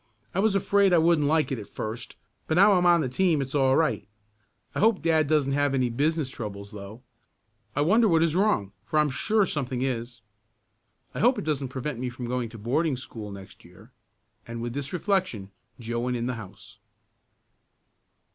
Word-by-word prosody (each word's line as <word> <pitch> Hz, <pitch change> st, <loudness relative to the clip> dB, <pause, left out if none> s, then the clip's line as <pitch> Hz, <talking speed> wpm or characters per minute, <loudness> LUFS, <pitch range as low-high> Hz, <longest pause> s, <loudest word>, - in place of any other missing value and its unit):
"I 185 Hz, -, -1 dB
was 210 Hz, 0 st, +2 dB
afraid 195 Hz, 0 st, +3 dB
I -, -, +6 dB
wouldn't 160 Hz, -2 st, +3 dB
like 155 Hz, 0 st, +2 dB
it 130 Hz, -, -2 dB
at 105 Hz, -, -9 dB
first, 115 Hz, +2 st, -6 dB, 0.3 s
but 160 Hz, -, 0 dB
now 200 Hz, +4 st, +6 dB
I'm 180 Hz, -1 st, +3 dB
on 170 Hz, -1 st, +5 dB
the 135 Hz, -, -1 dB
team 165 Hz, +4 st, +1 dB
it's 135 Hz, -1 st, -4 dB
all 135 Hz, -2 st, +3 dB
right. 150 Hz, -, 0 dB, 0.7 s
I -, -, -3 dB
hope 220 Hz, -3 st, +3 dB
dad 160 Hz, -2 st, +3 dB
doesn't 145 Hz, -2 st, +2 dB
have 140 Hz, 0 st, +1 dB
any 125 Hz, -2 st, +1 dB
business 145 Hz, +2 st, 0 dB
troubles 100 Hz, -4 st, -7 dB
though. 105 Hz, +4 st, -10 dB, 0.7 s
I 145 Hz, -, +1 dB
wonder 220 Hz, +9 st, +4 dB
what 165 Hz, -4 st, +3 dB
is 165 Hz, -1 st, +1 dB
wrong 180 Hz, -, +1 dB
for 155 Hz, -, -2 dB
I'm 150 Hz, -2 st, +3 dB
sure 210 Hz, +9 st, +2 dB
something 130 Hz, -6 st, -2 dB
is. 120 Hz, -2 st, -3 dB, 0.9 s
I -, -, -5 dB
hope 250 Hz, +3 st, +4 dB
it -, -, -4 dB
doesn't 145 Hz, -3 st, -1 dB
prevent 130 Hz, 0 st, -5 dB
me 125 Hz, 0 st, -2 dB
from 125 Hz, 0 st, -7 dB
going 120 Hz, -1 st, -2 dB
to 115 Hz, -, -11 dB
boarding 135 Hz, +7 st, 0 dB
school 110 Hz, -4 st, -8 dB
next 100 Hz, -1 st, -11 dB
year," -, -, -17 dB, 0.6 s
and 115 Hz, 0 st, -6 dB
with 120 Hz, 0 st, -4 dB
this 140 Hz, 0 st, -4 dB
reflection 180 Hz, -, -1 dB, 0.3 s
Joe 120 Hz, 0 st, -3 dB
went 125 Hz, +1 st, -1 dB
in 120 Hz, -, -3 dB
the 125 Hz, -, -1 dB
house. 110 Hz, -6 st, -11 dB
135 Hz, 195 wpm, -26 LUFS, 120-165 Hz, 0.9 s, I